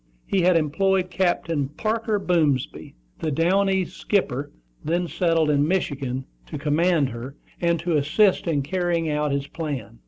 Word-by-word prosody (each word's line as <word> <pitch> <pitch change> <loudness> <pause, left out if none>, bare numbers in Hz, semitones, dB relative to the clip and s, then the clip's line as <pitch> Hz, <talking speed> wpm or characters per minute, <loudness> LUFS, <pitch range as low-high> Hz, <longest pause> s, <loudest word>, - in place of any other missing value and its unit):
He 195 - +1
had 175 0 +4
employed 185 +4 +1
Captain 165 -5 0
Parker 220 +6 -1
Boomsby, 160 -9 0 0.2
the 160 - -1
down 180 +7 +2
east 190 -1 -1
skipper, 145 -9 -1 0.3
then 170 +3 0
settled 165 -3 +1
in 145 0 +2
Michigan, 135 -7 -2 0.2
to - - -6
command 150 0 +2
her, 125 +3 -7 0.3
and 170 -1 +2
to 170 -2 +1
assist 180 +8 +2
in 145 -4 +1
carrying 170 0 -1
out 150 0 0
his 140 0 -1
plan. 135 -9 -6
165 Hz, 150 wpm, -24 LUFS, 145-180 Hz, 0.3 s, had